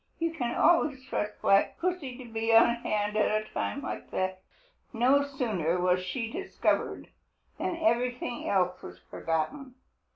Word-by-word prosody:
You 330 Hz, 0 st, -1 dB
can 245 Hz, -7 st, -2 dB
always 295 Hz, -6 st, +3 dB
trust 210 Hz, -5 st, -3 dB
Black 195 Hz, 0 st, +4 dB
Pussy 340 Hz, -8 st, -2 dB
to 255 Hz, -, -9 dB
be 225 Hz, 0 st, -1 dB
on 235 Hz, +1 st, +7 dB
hand 210 Hz, -2 st, -1 dB
at 215 Hz, 0 st, +2 dB
a -, -, -15 dB
time 280 Hz, -, -2 dB
like -, -, -5 dB
that. 185 Hz, 0 st, -2 dB, 0.5 s
No 255 Hz, +5 st, +4 dB
sooner 215 Hz, -, -1 dB
was 180 Hz, 0 st, +2 dB
she 225 Hz, +5 st, -3 dB
discovered 385 Hz, +5 st, -1 dB, 0.5 s
than 365 Hz, -1 st, -1 dB
everything 250 Hz, -6 st, 0 dB
else 180 Hz, -2 st, +1 dB
was 90 Hz, -, -10 dB
forgotten. 250 Hz, -, -3 dB
235 Hz, 150 wpm, -29 LUFS, 195-275 Hz, 0.5 s, on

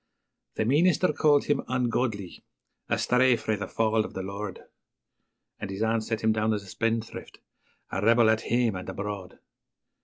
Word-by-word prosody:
The 110 Hz, -, 0 dB
meenister 165 Hz, +6 st, +3 dB
called 145 Hz, -1 st, +4 dB
him 145 Hz, -, +1 dB
'ungodly 120 Hz, -6 st, -2 dB, 0.5 s
a -, -, +1 dB
stray 125 Hz, 0 st, +3 dB
frae 110 Hz, -1 st, -1 dB
the 100 Hz, -, -5 dB
fauld 110 Hz, -1 st, +1 dB
o' -, -, -5 dB
the 95 Hz, -, -6 dB
Lord', 100 Hz, 0 st, -6 dB, 1.0 s
And -, -, -5 dB
his 95 Hz, +3 st, -3 dB
aunt 110 Hz, 0 st, +1 dB
set 110 Hz, 0 st, -3 dB
him 110 Hz, -, +3 dB
down 110 Hz, 0 st, +1 dB
as 100 Hz, -, -5 dB
a -, -, -14 dB
spendthrift, 115 Hz, +3 st, -3 dB, 0.5 s
'a 95 Hz, -, -2 dB
rebel 115 Hz, 0 st, +5 dB
at 110 Hz, -, +1 dB
hame 120 Hz, -3 st, +1 dB
and 90 Hz, +1 st, -6 dB
abroad'. 100 Hz, -1 st, -6 dB
110 Hz, 165 wpm, -27 LUFS, 105-120 Hz, 1.0 s, rebel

